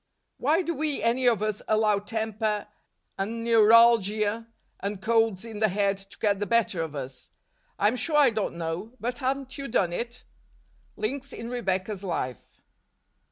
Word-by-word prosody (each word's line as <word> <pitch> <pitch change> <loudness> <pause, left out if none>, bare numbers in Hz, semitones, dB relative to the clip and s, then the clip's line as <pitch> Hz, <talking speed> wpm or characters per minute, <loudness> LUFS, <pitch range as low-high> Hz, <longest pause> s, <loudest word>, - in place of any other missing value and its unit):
Why 315 +7 +2
do 335 - -2
we, 300 -5 -2
any 245 +2 +2
of 225 -4 +3
us, 215 -1 -2
allow 215 -1 +3
temper, 215 0 -2 0.5
and 225 +4 -3
neuralgia, 225 -1 +5 0.3
and 200 0 -3
colds 225 -1 +1
in 220 -2 -7
the 215 - +4
head, 200 0 +1
to 195 0 -14
get 205 -2 +1
the 205 - -2
better 230 -7 +2
of 160 -2 -5
us? 130 -2 -7 0.5
I'm 210 +4 +2
sure 295 +6 +1
I 280 -4 +6
don't 215 -5 -2
know; 170 +7 -4
but 245 +1 -3
haven't 265 +1 -2
you 275 - -4
done 180 -6 +1
it? 240 +5 -4 0.7
Links 275 +5 -3
in 230 +1 -7
Rebecca's 195 -3 -2
Life. 130 - -5
220 Hz, 160 wpm, -27 LUFS, 200-235 Hz, 0.7 s, I